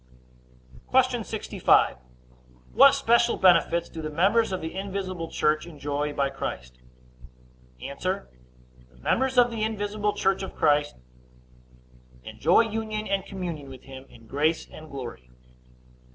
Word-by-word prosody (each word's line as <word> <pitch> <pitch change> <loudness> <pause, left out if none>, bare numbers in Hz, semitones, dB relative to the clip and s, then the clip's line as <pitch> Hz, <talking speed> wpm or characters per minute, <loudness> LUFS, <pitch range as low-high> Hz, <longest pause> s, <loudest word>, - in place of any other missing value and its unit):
Q. - - +2
65. - - +2 0.8
What - - +7
special 235 +1 +3
benefits 170 -2 +4
do 160 - -8
the 155 - -4
members 195 +8 +2
of 185 - -2
the 160 0 -6
invisible 190 -3 -4
church 155 +2 0
enjoy 145 -2 -3
by 140 -1 0
Christ? 60 - -6 1.0
A. - - -6
The - - -2 0.7
members 260 - 0
of 245 -1 +5
the 225 -2 -4
invisible 210 -1 -1
church 195 0 0
by 190 - -4
Christ 150 -1 +1 1.3
enjoy 165 - +3
union 220 -1 -3
and 195 -1 0
communion 170 -8 -6
with 130 -2 -12
him 135 0 -11
in 115 - -17
grace 150 +7 0
and 155 0 -12
glory. 120 - -8
170 Hz, 125 wpm, -26 LUFS, 145-205 Hz, 1.3 s, What